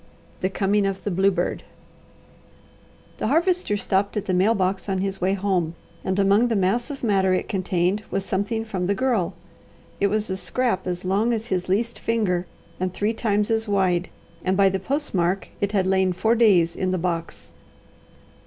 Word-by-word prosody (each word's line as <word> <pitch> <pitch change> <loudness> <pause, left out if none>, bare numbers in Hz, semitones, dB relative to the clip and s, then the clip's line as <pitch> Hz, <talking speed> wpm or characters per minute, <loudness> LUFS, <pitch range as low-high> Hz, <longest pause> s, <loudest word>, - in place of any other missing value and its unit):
THE 185 - 0
COMING 200 +1 +1
OF 195 0 -4
THE 205 - -2
BLUEBIRD 190 +2 +1 1.6
The - - -1
Harvester 345 - +1
stopped 200 +1 0
at 205 - -2
the 185 - -1
mail 195 +6 +3
box 190 0 -1
on 190 - 0
his 195 0 -2
way 190 +2 +2
home 185 -4 0 0.3
and 190 0 -1
among 200 +4 +4
the 230 - 0
mass 200 +5 +1
of 275 -3 -7
matter 190 -4 +3
it - - -2
contained 185 0 0
was 195 - -2
something 220 +4 -1
from 185 -5 -2
the 200 - +1
Girl. 230 -6 0 0.6
It 200 - +3
was 215 +1 0
a 190 - -2
scrap 225 -4 -1
as 180 0 -3
long 205 +6 +2
as 225 -1 -2
his 185 -5 -2
least 230 +5 0
finger 185 -6 0 0.3
and 185 0 -1
three 205 +4 -1
times 210 -2 0
as 225 0 0
wide, 185 -3 +1 0.3
and 185 +1 +1
by 195 -1 +5
the 190 0 -1
postmark 195 - -1
it 200 0 0
had 195 -3 +1
lain 190 -1 +2
four 220 +6 +2
days 195 -8 +4
in 185 - -1
the 185 - 0
box. 170 -1 -4
195 Hz, 180 wpm, -23 LUFS, 185-215 Hz, 1.6 s, by